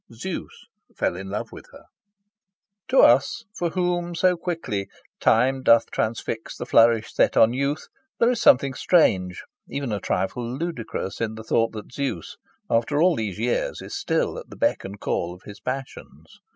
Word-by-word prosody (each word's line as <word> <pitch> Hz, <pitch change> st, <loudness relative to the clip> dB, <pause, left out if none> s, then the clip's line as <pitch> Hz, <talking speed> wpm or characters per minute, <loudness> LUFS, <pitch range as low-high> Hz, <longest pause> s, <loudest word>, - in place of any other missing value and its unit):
Zeus 145 Hz, +11 st, -7 dB, 0.3 s
fell -, -, 0 dB
in 95 Hz, +1 st, -7 dB
love 105 Hz, +2 st, -4 dB
with -, -, -11 dB
her. -, -, -14 dB, 1.0 s
To 260 Hz, +1 st, +5 dB
us, 140 Hz, -, +4 dB
for 175 Hz, -, -1 dB
whom 175 Hz, 0 st, -1 dB
so 180 Hz, +1 st, +3 dB
quickly 165 Hz, -, -3 dB, 0.3 s
"time 130 Hz, +4 st, +3 dB
doth 115 Hz, -3 st, +4 dB
transfix 110 Hz, 0 st, -3 dB
the -, -, -5 dB
flourish 115 Hz, -2 st, +4 dB
set -, -, +2 dB
on 115 Hz, +1 st, +6 dB
youth," 140 Hz, +4 st, -1 dB, 0.3 s
there 235 Hz, +1 st, +4 dB
is 240 Hz, -, -2 dB
something 135 Hz, +1 st, +5 dB
strange, 95 Hz, -, +2 dB, 0.3 s
even 140 Hz, -4 st, -3 dB
a 105 Hz, -, -1 dB
trifle 120 Hz, +7 st, -2 dB
ludicrous, 130 Hz, -, -4 dB
in 110 Hz, -1 st, -2 dB
the 110 Hz, -, -8 dB
thought 115 Hz, +1 st, +1 dB
that 110 Hz, +2 st, -8 dB
Zeus, 130 Hz, -, -4 dB, 0.3 s
after 115 Hz, +6 st, +1 dB
all 175 Hz, +1 st, +4 dB
these 105 Hz, -6 st, -3 dB
years, 120 Hz, +2 st, -1 dB
is -, -, -7 dB
still -, -, -1 dB
at -, -, -12 dB
the -, -, -11 dB
beck -, -, +1 dB
and 100 Hz, +1 st, -8 dB
call 90 Hz, -3 st, -2 dB
of 90 Hz, -, -19 dB
his 100 Hz, -1 st, -11 dB
passions. 130 Hz, +1 st, -7 dB
120 Hz, 170 wpm, -24 LUFS, 110-160 Hz, 1.0 s, on